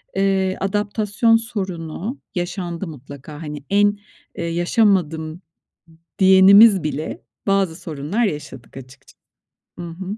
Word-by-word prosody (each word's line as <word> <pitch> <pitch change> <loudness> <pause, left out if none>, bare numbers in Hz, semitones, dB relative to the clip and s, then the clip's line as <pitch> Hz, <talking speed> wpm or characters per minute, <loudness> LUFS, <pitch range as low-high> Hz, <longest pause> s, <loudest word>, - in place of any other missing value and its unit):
eee, 195 -1 +1
adaptasyon 210 +3 +1
sorunu 195 - -4 0.2
yaşandı 175 0 -4
mutlaka. 145 +1 -11
Hani, 150 -2 -7
en, 205 +1 +3 0.4
eee, - - -5
yaşamadım 170 -3 0
d - - -24 0.8
diyenimiz 190 +1 +7
bile 155 0 -4 0.3
bazı 195 -4 +1
sorunlar 165 +6 -3
yaşadık 140 - -6
açıkça. 130 +1 -14 0.6
Hı 175 - -5
hı. 190 +5 -7
185 Hz, 105 wpm, -20 LUFS, 160-200 Hz, 0.8 s, diyenimiz